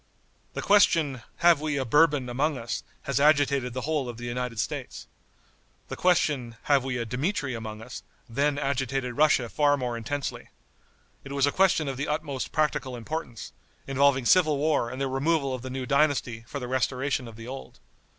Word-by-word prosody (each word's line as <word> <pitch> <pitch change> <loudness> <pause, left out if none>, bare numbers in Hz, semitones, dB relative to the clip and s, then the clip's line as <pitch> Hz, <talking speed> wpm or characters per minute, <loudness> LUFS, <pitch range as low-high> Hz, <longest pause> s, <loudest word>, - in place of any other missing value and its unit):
The - - -3
question, 165 - +4 0.2
"Have 170 -4 +6
we 150 -2 -1
a 135 - -1
Bourbon 145 0 +3
among 140 +4 0
us?" 120 0 -4 0.2
has 140 -1 -1
agitated 140 -4 +3
the 130 - -2
whole 145 -3 -1
of 120 - -7
the 120 - -7
United 120 -1 -3
States. 100 - -4 0.8
The - - -4
question, 145 -9 +1
"Have 140 -3 +3
we 130 -2 -2
a 120 - -2
Dmitri 135 - -2
among 110 -1 -6
us?" - - -8 0.3
then 140 +4 0
agitated 135 -3 -1
Russia 145 -5 +3
far 145 +7 +2
more 125 -3 -3
intensely. 130 +5 -4 0.7
It 140 - -8
was 140 -1 +3
a 145 - +1
question 180 -4 +3
of 135 -1 -3
the 140 - -2
utmost 150 -3 -3
practical 150 -4 0
importance, 120 -2 -6 0.3
involving 135 -1 +2
civil 155 -1 +4
war 145 -5 +1
and 130 +2 -7
the 135 - 0
removal 135 +1 0
of 130 - -4
the 130 - -6
new 130 0 -4
dynasty 135 -5 +1
for 140 - -5
the 125 - -5
restoration 130 0 -1
of 115 - -11
the 115 +1 -10
old. 135 +1 -9
135 Hz, 180 wpm, -27 LUFS, 125-150 Hz, 0.8 s, Have